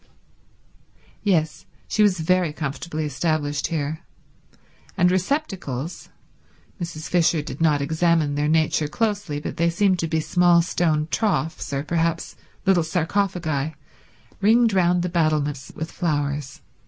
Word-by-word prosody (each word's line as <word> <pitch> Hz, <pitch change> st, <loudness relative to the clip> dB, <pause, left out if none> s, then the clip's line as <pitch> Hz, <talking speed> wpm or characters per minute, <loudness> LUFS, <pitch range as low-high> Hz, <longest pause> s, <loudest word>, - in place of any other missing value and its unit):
Yes, 165 Hz, -7 st, 0 dB, 0.2 s
she 215 Hz, -, 0 dB
was 195 Hz, -5 st, +3 dB
very 180 Hz, 0 st, +2 dB
comfortably 155 Hz, +1 st, -4 dB
established 145 Hz, 0 st, -1 dB
here; 155 Hz, -1 st, -2 dB, 1.0 s
and 180 Hz, -1 st, +4 dB
receptacles—Mrs. 175 Hz, -, -5 dB
Fisher 170 Hz, -3 st, +2 dB
did 135 Hz, +2 st, -7 dB
not 150 Hz, -3 st, +3 dB
examine 160 Hz, 0 st, +2 dB
their 145 Hz, +1 st, 0 dB
nature 155 Hz, -1 st, +2 dB
closely, 205 Hz, -4 st, -1 dB
but -, -, -6 dB
they 170 Hz, +1 st, +2 dB
seemed 185 Hz, +1 st, +2 dB
to 165 Hz, -, -1 dB
be 160 Hz, 0 st, 0 dB
small 175 Hz, +1 st, +4 dB
stone 160 Hz, -3 st, 0 dB
troughs, 190 Hz, -9 st, -1 dB
or 140 Hz, 0 st, -1 dB
perhaps 165 Hz, +1 st, -1 dB, 0.3 s
little 190 Hz, -3 st, +4 dB
sarcophagi— 160 Hz, -3 st, -1 dB, 0.7 s
ringed 225 Hz, +2 st, +4 dB
round 180 Hz, -1 st, +3 dB
the -, -, 0 dB
battlements 150 Hz, -5 st, 0 dB
with 160 Hz, +1 st, -5 dB
flowers. 145 Hz, -4 st, -2 dB
165 Hz, 120 wpm, -23 LUFS, 150-180 Hz, 1.0 s, and